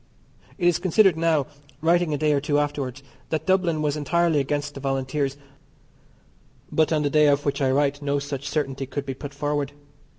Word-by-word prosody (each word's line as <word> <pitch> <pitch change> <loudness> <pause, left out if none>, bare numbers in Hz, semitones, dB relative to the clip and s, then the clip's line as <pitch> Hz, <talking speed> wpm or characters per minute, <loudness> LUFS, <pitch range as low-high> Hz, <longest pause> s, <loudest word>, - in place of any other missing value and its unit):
It 175 - +2
is 175 - +3
considered 185 0 +4
now 160 -3 +2 0.3
(writing 170 +1 +2
a 145 - 0
day 150 +1 +2
or 140 - +1
two 145 0 +1
afterwards) 145 -3 -2 0.3
that 160 -1 -2
Dublin 180 -5 +2
was 150 -1 0
entirely 165 +1 +1
against 145 +1 -2
the 140 - -8
Volunteers, 135 +1 -1 1.3
but 160 0 +2
on 155 -2 +2
the 145 - +1
day 150 0 +5
of 145 0 +2
which 140 0 -1
I 135 - +3
write 145 +1 +1
no 145 0 0
such 140 -1 -4
certainty 135 -3 -2
could 140 +1 -4
be 135 - -3
put 140 +2 -8
forward. 145 0 -2
145 Hz, 190 wpm, -24 LUFS, 140-155 Hz, 1.3 s, day